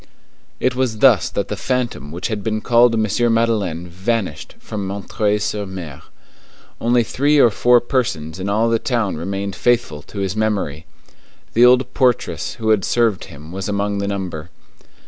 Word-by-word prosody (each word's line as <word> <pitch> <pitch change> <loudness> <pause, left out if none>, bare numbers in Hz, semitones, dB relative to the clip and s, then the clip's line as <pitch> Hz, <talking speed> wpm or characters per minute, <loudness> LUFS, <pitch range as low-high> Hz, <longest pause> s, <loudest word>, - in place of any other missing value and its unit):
It 130 - +1
was 125 -4 -1
thus 110 -8 +5
that 100 - -2
the 105 - -3
phantom 120 - -2
which 85 +3 -4
had 105 -3 -3
been 110 -1 -1
called 120 +1 +4
M. 110 -1 +1 0.3
Madeleine 100 -7 0
vanished 95 -1 -3
from 100 -3 -5
M. 100 0 -5 0.3
sur 105 0 -2
M. 90 -8 -7 0.8
Only 120 +1 +3
three 145 +6 +1
or 120 -5 +6
four 120 +4 +4
persons 95 - -2
in 95 +2 -3
all 110 +3 +2
the 115 0 +2
town 115 -6 -1
remained 95 +4 -4
faithful 115 -7 +1
to 100 - -13
his 95 0 -2
memory. 100 -9 -2 0.7
The 120 +2 +6
old 125 0 +3
portress 120 - 0
who 110 -2 -2
had 105 -3 +3
served 115 -4 +1
him 75 +3 -12
was 95 +2 -4
among 100 0 -1
the 100 - -2
number. 90 -5 -4
105 Hz, 165 wpm, -19 LUFS, 95-120 Hz, 0.8 s, or